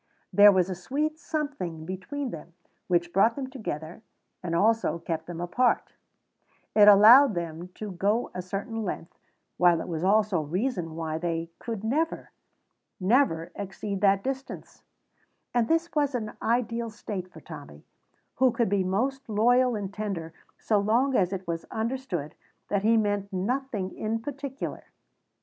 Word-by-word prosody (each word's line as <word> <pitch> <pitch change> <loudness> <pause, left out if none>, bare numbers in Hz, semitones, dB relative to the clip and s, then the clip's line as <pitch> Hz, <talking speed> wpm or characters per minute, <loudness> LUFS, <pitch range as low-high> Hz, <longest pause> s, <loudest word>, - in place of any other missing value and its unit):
There 205 0 +9
was 185 -2 +2
a 190 - -3
sweet 295 - -2
something 280 - -4
between 230 - -4
them 165 +1 -9 0.3
which 175 -1 +1
brought 220 +5 +4
them 265 -2 -5
together 170 - -6 0.4
and 170 -2 -2
also 220 0 +2
kept 165 -1 -4
them 175 -1 -6
apart; 235 +9 +1 0.8
it 210 -1 +7
allowed 220 +4 +8
them 170 0 -4
to 210 -2 -6
go 205 +6 0
a 180 - -4
certain 200 +5 -4
length, 175 -4 -5 0.4
while 175 -2 +5
it - - -5
was 165 -2 -3
also 205 -1 +3
a - - -2
reason 175 - -2
why 160 -1 -3
they 165 -1 -3
could 225 -3 -5
never, 300 +9 -1 0.7
never 185 -5 +2
exceed 200 0 -5
that 195 -1 +4
distance; 270 0 -6 0.7
and 240 -2 +2
this 330 +3 +1
was 290 -3 +1
an 215 -3 -3
ideal 235 0 0
state 200 -4 -6
for - - -12
Tommy, 145 - -11 0.5
who 260 0 +4
could 230 -3 0
be 200 -1 +2
most 255 +8 -1
loyal 245 +3 +3
and 200 -2 -4
tender 195 -6 -4 0.2
so 210 -2 +1
long 240 +7 +2
as 185 -4 +2
it 190 -2 -5
was 165 -1 -3
understood 220 - -3 0.4
that 200 -1 +1
he 225 +2 +4
meant 205 -2 0
nothing 205 0 -2
in 220 +1 -2
particular. 275 +2 -6
205 Hz, 155 wpm, -27 LUFS, 175-245 Hz, 0.8 s, There